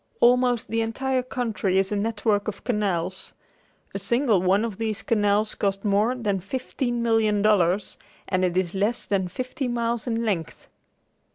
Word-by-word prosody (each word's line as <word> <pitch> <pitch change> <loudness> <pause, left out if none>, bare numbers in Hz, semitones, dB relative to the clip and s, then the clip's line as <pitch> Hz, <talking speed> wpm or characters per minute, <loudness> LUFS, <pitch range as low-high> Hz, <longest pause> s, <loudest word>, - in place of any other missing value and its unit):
Almost 245 -1 +3
the 225 0 0
entire 260 +3 -1
country 230 -7 -1
is 195 +1 +1
a - - 0
network 205 0 0
of 200 -2 -5
canals. 190 -6 -2 0.6
A 195 - -3
single 230 0 +2
one 195 +4 +3
of 220 -3 -6
these 220 -2 -2
canals 210 -1 +2
cost 195 0 -2
more 210 +5 +2
than 210 -6 -1
fifteen 240 +3 -3
million 220 -3 +2
dollars 195 -2 +2 0.3
and 185 -1 0
it 180 -1 +1
is 180 -2 0
less 205 +5 -1
than 190 -2 0
fifty 255 +7 -4
miles 235 -1 -1
in 230 0 -1
length. 180 -7 -3
215 Hz, 160 wpm, -25 LUFS, 195-235 Hz, 0.6 s, Almost